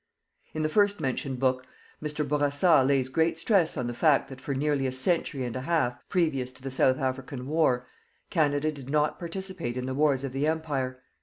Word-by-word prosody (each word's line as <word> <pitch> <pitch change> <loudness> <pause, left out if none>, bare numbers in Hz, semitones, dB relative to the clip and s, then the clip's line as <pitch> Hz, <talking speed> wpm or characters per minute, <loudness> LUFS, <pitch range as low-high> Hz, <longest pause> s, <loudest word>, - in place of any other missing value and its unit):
In 155 - -1
the - - +2
first 205 +4 +2
mentioned 130 0 -2
work, 130 0 +2 0.4
Mr. 150 -1 -2
Bourassa 145 +1 +3
lays 135 -1 +2
great 160 +5 +1
stress 175 -1 +2
on 125 - -1
the 120 - -3
fact 140 +1 +3
that 135 -1 -10
for 140 - -3
nearly 140 -1 +1
a - - -2
century 135 0 0
and 120 -1 -4
a 130 - -3
half, 145 -4 +1
previous 150 -9 0
to 130 - -16
the 135 - -4
South 130 0 +3
African 130 -1 -3
War, 135 -5 +1 0.5
Canada 155 -2 +2
did 140 -3 -10
not 150 +1 +1
participate 175 -8 -5
in 125 - -3
the 130 - -3
wars 140 -1 +2
of 135 - -3
the 135 +3 0
Empire. 135 -5 -2
140 Hz, 200 wpm, -27 LUFS, 130-155 Hz, 0.5 s, Bourassa